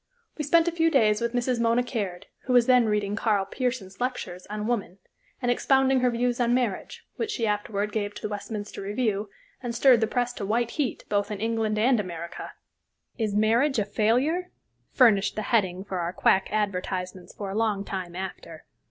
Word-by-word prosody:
We 300 - -3
spent 330 +3 +4
a - - +2
few 330 -1 +2
days 220 -8 +3
with 235 0 -1
Mrs. 245 0 0
Mona 235 +1 +2
Caird, 200 -8 -4 0.2
who 255 - 0
was 245 -1 +6
then 250 -2 +5
reading 210 -1 0
Karl 210 -3 +1
Pearson's 235 -3 -4
lectures 245 -8 -4
on 210 +1 -4
"Woman," 205 -6 -2 0.4
and 245 -2 +1
expounding 265 +1 +3
her 250 0 +3
views 245 +1 0
on 240 0 +3
marriage, 240 -6 -2
which 450 - -2
she 240 - -1
afterward 210 0 -1
gave 205 -1 -2
to - - -10
the - - 0
Westminster 205 0 -6
Review, 205 0 -1 0.3
and 240 -2 -4
stirred 245 -1 +5
the 220 - +2
press 245 +1 -1
to 215 - -6
white 230 +4 0
heat 275 -7 -2
both 205 0 0
in 210 -2 -4
England 220 -1 0
and 240 +2 +3
America. 170 -3 -6 0.7
"Is 215 -3 -1
Marriage 235 +7 +3
a 210 - +1
Failure?" 255 - +1 0.4
furnished 210 -6 +4
the 215 - -2
heading 190 -5 +1
for 190 -2 -4
our 170 +1 -2
quack 190 +1 +3
advertisements 185 -3 -3
for 200 -2 -5
a - - -5
long 210 -3 0
time 185 -3 -5
after. 180 -4 -7
220 Hz, 190 wpm, -26 LUFS, 200-245 Hz, 0.7 s, was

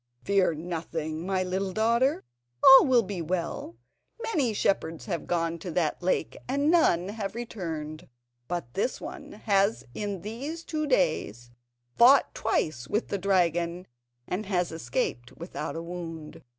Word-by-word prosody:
"Fear 195 -4 +2
nothing, 160 0 -4
my 190 -1 +1
little 190 +1 -2
daughter, 235 - +2 0.4
all 270 +1 +10
will 250 -3 +5
be 195 -3 -4
well. 170 -8 -3 0.5
Many 295 - +1
shepherds 165 -6 0
have 170 -6 -4
gone 165 -1 -1
to 180 - -6
that 165 -1 0
lake 180 +1 0
and 280 +4 +2
none 185 - +3
have 210 -1 -4
ever 195 - -5
returned; 160 -10 -5 0.4
but 170 -9 -4
this 245 - -1
one - - -8
has 205 0 +1
in 205 -4 -4
these 275 +10 -5
two 305 -2 -2
days 155 - 0 0.5
fought 260 +3 +7
twice 125 -6 -1
with 215 - -1
the 200 - -2
dragon 175 -2 +1 0.4
and 195 +3 -3
has 180 -3 0
escaped 125 -5 -3
without 165 -3 -5
a 165 - -4
wound. 165 -2 -7
180 Hz, 145 wpm, -28 LUFS, 165-215 Hz, 0.5 s, all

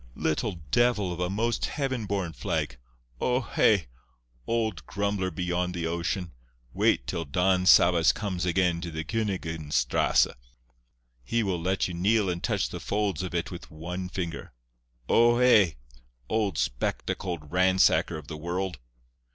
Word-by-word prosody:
Little 85 +2 -1
devil 120 -7 +2
of 85 - -8
a 90 0 0
most 115 +4 0
heaven 130 -7 -2
born 95 -5 -2
flag! - - -3 0.4
O 125 0 +1
hé! 105 - +2 0.6
old 110 -9 -1
grumbler 100 -2 -1
beyond 90 +1 -2
the 85 -1 -2
ocean. 85 +2 -2 0.4
Wait - - +2
till 85 - -3
Don 90 +5 +1
Sabas 85 -2 +6
comes 95 -5 -3
again 90 -1 +1
to 85 - -4
the 80 0 -4
Königin 80 -6 -3
Strasse. 65 -4 +3 1.0
He 115 - 0
will 95 -4 -1
let 95 +2 0
you 90 - -6
kneel 100 +2 +2
and 85 0 -4
touch 105 -6 0
the 90 - -6
folds 100 -1 -1
of 90 -1 -5
it 85 - -2
with 85 - -9
one 90 +4 -6
finger. 85 -3 -5 0.5
O 120 +1 +5
hé! 115 -9 +5 0.5
old 100 - 0
spectacled 75 +5 -2
ransacker 90 -2 +3
of 75 - -10
the 75 - -6
world!" 90 0 -3
90 Hz, 145 wpm, -27 LUFS, 85-100 Hz, 1.0 s, Sabas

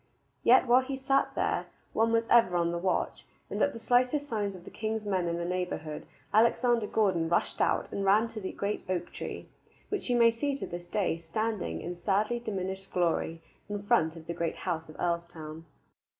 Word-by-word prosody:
Yet 255 +2 +6
while 250 +1 +6
he 265 +1 -4
sat 270 +1 +1
there, - - 0 0.3
one 225 +1 +3
was 230 0 +3
ever 230 -8 +5
on 170 0 +1
the 170 - -2
watch, 185 +1 -1 0.3
and - - -2
at 285 - +4
the 230 - -8
slightest 250 +5 +2
signs 205 -5 -2
of 180 -1 -12
king's 220 -1 -2
men 185 -4 0
in 170 0 -1
the 170 - -2
neighborhood 180 -4 -3 0.3
Alexander 235 0 +4
Gordon 185 -8 +1
rushed 170 - +1
out - - +2
and 200 - -2
ran 205 +4 +4
to 225 - -6
the 190 - -4
great 200 +1 -3
oak 175 -2 -2
tree, - - -6 0.4
which 410 -9 -2
you 245 - +3
may 230 -1 +6
see 275 +5 -1
to 280 - -4
this 175 0 -7
day 195 -5 0
standing 170 - -2
in 175 +1 -5
sadly 210 +6 +1
diminished 195 -3 -4
glory 165 -2 0 0.3
in 205 -1 -3
front 190 -8 +2
of 165 -1 -10
the 170 - -3
great 170 -1 -2
house 160 -3 -3
of 155 - -11
Earlstoun. 165 -2 -3
195 Hz, 195 wpm, -30 LUFS, 170-230 Hz, 0.4 s, Yet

